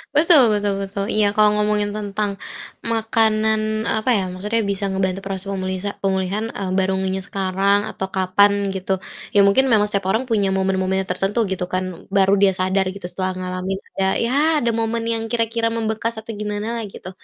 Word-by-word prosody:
Betul 310 -1 +6
betul 205 -1 0
betul. 195 0 -3
Iya, 205 -1 +3
kalo 215 0 +5
ngomongin 210 0 +1
tentang 205 -1 -2 0.5
makanan, 220 -1 +1
apa 220 +3 0
ya, 200 -4 +2
maksudnya 210 +5 -1
bisa 200 0 -1
ngebantu 190 0 -1
proses 195 0 -4
pemulisa 190 +1 -3
pemulihan, 195 +2 0
eee, 195 -2 -4
baru 190 0 +2
ngehnya 190 0 -1
sekarang 195 +1 +1
atau 190 - -4
kapan, 200 +2 +3
gitu. 190 0 -4 0.4
Ya 205 - +5
mungkin 230 +7 +4
memang 210 -2 +4
setiap 200 -2 -1
orang 225 +5 +1
punya 205 -4 +2
momen-momennya 190 0 0
tertentu, 195 +5 -1
gitu 185 -1 -1
kan. 185 -1 -3
Baru 195 0 +4
dia 200 -1 +6
sadar 190 +1 +1
gitu, 195 -2 -9
setelah 185 0 -2
ngalamin, 185 +1 -3 0.2
ada 195 - +2 0.2
ya 240 - -1 0.3
ada 235 - +1
momen 230 0 -1
yang 225 -1 -1
kira-kira 230 -1 0
membekas 225 0 -1
atau 220 - -8
gimanalah, 210 +2 -3
gitu. 185 - -8
200 Hz, 170 wpm, -21 LUFS, 190-220 Hz, 0.5 s, Betul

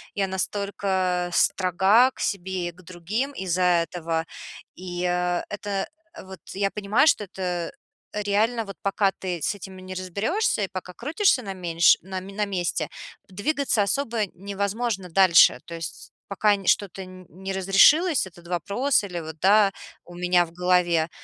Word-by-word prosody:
Я 195 -2 0
настолько 190 -2 -1
строга 190 +7 +4
к - - -17
себе 185 -2 -2
и - - -9
к 180 - -18
другим 185 +10 -3
из-за 185 -5 -2 0.2
этого. 165 -1 -3 0.5
И, 180 -1 -5
э, 180 0 0
это 205 -1 -3 0.4
вот 190 0 -11
я 195 0 0
понимаю, 210 +6 +2
что 210 -8 +3
это 180 -3 -4 0.4
реально, 210 +3 0
вот 195 - -8
пока 200 0 +1
ты 180 -3 -4
с 205 - 0
этим 190 -1 -10
не 185 0 -8
разберёшься 205 - -1
и - - -1
пока 185 -1 -7
крутишься 295 - +1
на 195 - -5
меньш 175 -2 +4
на 190 +1 -5
ме 195 +1 -10
на 210 +1 -1
месте, 185 -3 -2 0.4
двигаться 240 +2 0
особо 230 -1 -1
невозможно 200 +1 -3
дальше. 180 -1 +6
То 170 - -8
есть 165 -1 -8 0.2
пока 205 +1 +2
не 195 -2 -10
что-то 195 -1 +1
нь 185 0 -13
не 190 +2 -6
разрешилось, 195 - +4
этот 175 -1 -15
вопрос 200 - 0
или 180 -3 -5
вот 160 0 -8
да, 200 +2 +5 0.3
у 175 - -14
меня 180 0 +2
в 165 - -15
голове, 175 -2 +2
190 Hz, 160 wpm, -24 LUFS, 180-205 Hz, 0.5 s, дальше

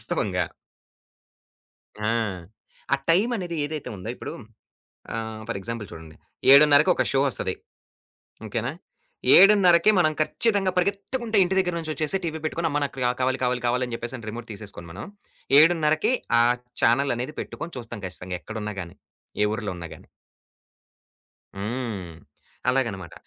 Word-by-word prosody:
వాస్తవంగా. - - -1 1.6
ఆ! - - +1 0.9
ఆ - - +3
టైం 190 +8 +4
అనేది 175 -4 -4
ఏదైతే 150 -2 -5
ఉందో 95 +3 -8
ఇప్పుడు - - -7 0.8
ఆహ్, 110 -1 -5
ఫర్ 115 - -3
ఎగ్జాంపుల్ 115 0 -5
చూడండి. 80 -1 -11 0.4
7:30కి 150 +3 +7
ఒక - - +3
షో 135 - +3
ఒస్తది. 95 -7 -1 0.9
ఓకేనా? 115 +4 -2 0.6
7:30కి 195 -2 +7
మనం 155 -3 +3
ఖచ్చితంగా 200 +4 +2
పరిగెత్తుకుంటే 205 +5 -1
ఇంటి 190 +2 -1
దగ్గర 180 -2 +1
నుంచొచ్చేసి 155 +1 -1
టీవీ 160 -1 -3
పెట్టుకొని 165 +1 -1
అమ్మ 145 0 0
నాకు 140 -1 -6 0.2
కావాలి, 130 +1 +1
కావాలి, 125 -1 0
కావాలి 125 +1 +1
అని 120 - -6
జెప్పేసని 115 -1 -6
రిమోట్ 120 +1 -8
తీసేసుకొని 100 -4 -7
మనం 100 - -8 0.5
7:30కి 155 +4 +3 0.3
ఆ - - +7 0.4
చానెల్ 135 +4 +3
అనేది 125 +5 -5
పెట్టుకొని 170 0 -7
చూస్తాం 115 -3 -7
ఖచ్చితంగా 90 0 -5
ఎక్కడున్నా 105 -2 -5
గాని. 85 - -12 0.5
ఏ - - +4
ఊర్లో 110 -3 -3
ఉన్నా 85 -1 -7
గాని. - - -17 1.5
హ్మ్. 105 -4 -4 0.5
అలాగనమాట. 105 -10 -1
130 Hz, 130 wpm, -25 LUFS, 110-165 Hz, 1.6 s, 7:30కి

